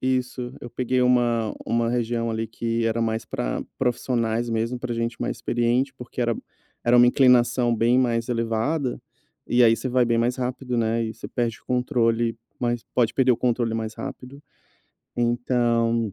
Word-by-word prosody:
isso. 125 -1 -1
Eu 120 - -8
peguei 125 +1 0
uma 120 -3 +2
uma 115 0 +1
região 115 -1 -1
ali 110 0 -2
que 115 +1 -2
era 115 +1 0
mais 110 0 -1
pra - - -3
profissionais 120 -2 0
mesmo, 115 +2 -1
pra 120 -1 -4
gente 115 0 -3
mais - - -2
experiente, 120 +3 0
porque 125 0 -8
era 120 -1 +1 0.5
era 120 +1 +5
uma 120 - +7
inclinação 125 -2 +4
bem 120 +3 +3
mais 115 -2 +1
elevada, 120 +4 -1 0.5
e 120 +1 +3
aí 115 0 +5
você 130 - -4
vai 125 0 +3
bem 115 -1 +1
mais 120 +2 +1
rápido, 125 0 -3
né, 115 0 +1
e 110 - -4
você 115 - -8
perde 120 -3 -2
o - - -35
controle 120 -3 +1 0.2
mais 120 -1 -1
pode 120 -2 +2
perder 130 -1 +3
o 115 - 0
controle 120 -2 0
mais 110 -1 -3
rápido, 135 +3 -8 0.8
então, 120 -2 +1
120 Hz, 170 wpm, -24 LUFS, 115-125 Hz, 0.8 s, uma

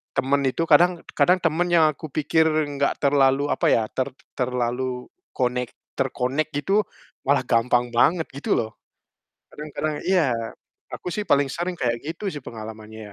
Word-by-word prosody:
temen 140 +2 +2
itu 165 - -1
kadang 175 +3 +5
kadang 180 +1 +4
temen 165 +2 +1
yang 165 -2 +6
aku 155 +2 -9
pikir 155 +2 +2
nggak 145 -3 0
terlalu, 140 0 +3
apa - - +1
ya, 115 - +4
ter 130 0 -1 0.2
terlalu 125 0 -2 0.2
konek 125 -1 -1 0.2
terkonek 135 +2 0
gitu, 195 +8 +2 0.5
malah - - +3
gampang 120 +1 +2
banget, 160 +7 +3
gitu 140 +1 -1
loh. 110 -1 -2 0.8
Kadang-kadang 150 0 -4
iya, 180 -8 +3 0.6
aku - - -7
sih 210 - -2
paling 140 -1 +3
sering 175 +3 -3
kayak 120 -1 0
gitu 165 +6 -5
sih 145 - -6
pengalamannya 110 -1 -9
140 Hz, 145 wpm, -23 LUFS, 125-155 Hz, 0.8 s, yang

